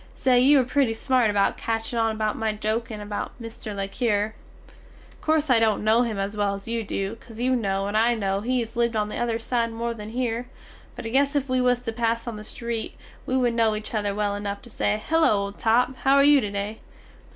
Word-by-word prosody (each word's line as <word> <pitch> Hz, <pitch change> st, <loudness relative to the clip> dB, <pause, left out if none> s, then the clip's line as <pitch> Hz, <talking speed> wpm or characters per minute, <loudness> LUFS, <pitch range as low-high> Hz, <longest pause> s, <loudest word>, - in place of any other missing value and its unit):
Say 250 Hz, -2 st, +3 dB
you 280 Hz, +4 st, +6 dB
were 265 Hz, -, +4 dB
pretty 250 Hz, -2 st, +1 dB
smart 250 Hz, -1 st, +2 dB
about 200 Hz, -1 st, +2 dB
catching 225 Hz, +1 st, -2 dB
on 225 Hz, -1 st, +1 dB
about 215 Hz, -1 st, -1 dB
my 220 Hz, -1 st, -1 dB
jokin 220 Hz, +1 st, -2 dB
about 205 Hz, +3 st, -5 dB
Mr. 225 Hz, -2 st, -7 dB
le 195 Hz, 0 st, -2 dB
Cure. 215 Hz, -1 st, 0 dB, 0.9 s
Corse 310 Hz, -1 st, +1 dB
I 235 Hz, -, +6 dB
dont 220 Hz, -2 st, +2 dB
no 220 Hz, +2 st, +4 dB
him 230 Hz, -4 st, -1 dB
as 195 Hz, +1 st, -3 dB
well 205 Hz, -1 st, 0 dB
as 195 Hz, +2 st, -10 dB
you 230 Hz, 0 st, -1 dB
do, 200 Hz, +1 st, -3 dB
caus 225 Hz, -1 st, -14 dB
you 255 Hz, +1 st, +2 dB
no 195 Hz, -4 st, -1 dB
and 205 Hz, +1 st, -3 dB
I 230 Hz, +2 st, +3 dB
no 195 Hz, -2 st, -1 dB
he 255 Hz, +4 st, 0 dB
has 230 Hz, -1 st, -7 dB
lived 235 Hz, -1 st, +1 dB
on 210 Hz, -1 st, 0 dB
the -, -, -5 dB
other 235 Hz, -1 st, 0 dB
side 230 Hz, 0 st, -1 dB
more 235 Hz, +1 st, -3 dB
than 210 Hz, -2 st, -8 dB
hear, 240 Hz, 0 st, -2 dB, 0.5 s
but -, -, -8 dB
I -, -, -2 dB
guess 280 Hz, +4 st, +2 dB
if 275 Hz, -2 st, 0 dB
we 255 Hz, 0 st, +2 dB
was 250 Hz, 0 st, +3 dB
to 230 Hz, -2 st, -4 dB
pass 230 Hz, 0 st, 0 dB
on 235 Hz, -, -4 dB
the 210 Hz, -, -8 dB
street, 230 Hz, +1 st, -5 dB, 0.3 s
we 260 Hz, -, +1 dB
wood 245 Hz, -2 st, +2 dB
no 225 Hz, -2 st, +2 dB
each 215 Hz, +5 st, -6 dB
other 205 Hz, -2 st, -1 dB
well 205 Hz, -1 st, 0 dB
enuf 205 Hz, 0 st, -4 dB
to 240 Hz, -, -13 dB
say, 210 Hz, 0 st, 0 dB
Hello, 325 Hz, -6 st, +4 dB
old 200 Hz, 0 st, -2 dB
top, 245 Hz, +3 st, +2 dB
how 270 Hz, 0 st, +3 dB
are 280 Hz, -, +6 dB
you 290 Hz, -1 st, +6 dB
to 210 Hz, -, -2 dB
day? 205 Hz, +2 st, -4 dB
225 Hz, 240 wpm, -25 LUFS, 210-245 Hz, 0.9 s, you